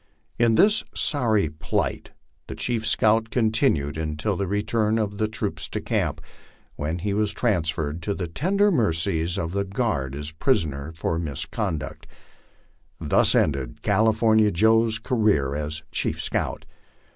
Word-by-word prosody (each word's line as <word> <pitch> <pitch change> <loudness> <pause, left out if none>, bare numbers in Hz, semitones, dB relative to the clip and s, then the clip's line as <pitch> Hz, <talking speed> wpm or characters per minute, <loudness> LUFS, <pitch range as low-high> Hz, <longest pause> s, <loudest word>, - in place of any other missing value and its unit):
In 115 -1 +3
this 210 - +4
sorry 110 - +2
plight 75 +1 -3 0.4
the - - -7
chief 115 -2 -1
scout 110 0 +3
continued 110 - +1
until 80 +6 -2
the 100 +1 -2
return 105 +2 0
of 105 -2 -2
the 110 - +1
troops 110 - -2
to - - -3
camp, - - -2 0.5
when 80 +4 -3
lie 100 - 0
was 105 0 +1
transferred 80 -7 -1
to 100 +4 -2
the 90 - -3
tender 195 - +1
mercies 85 - +1
of 85 -3 -3
the 100 +1 -1
guard 95 - -2
as 75 +2 -5
a - - -27
prisoner 80 - 0
for 80 0 -2
mis 75 -6 -3
conduct. 80 -3 -4 0.9
Thus - - +3
ended 65 -5 0
California 110 +1 +3
Joe's 110 +4 +3
career 105 - +1
as 75 +1 -3
chief - - -1
scout. - - -2
100 Hz, 145 wpm, -24 LUFS, 80-110 Hz, 0.9 s, this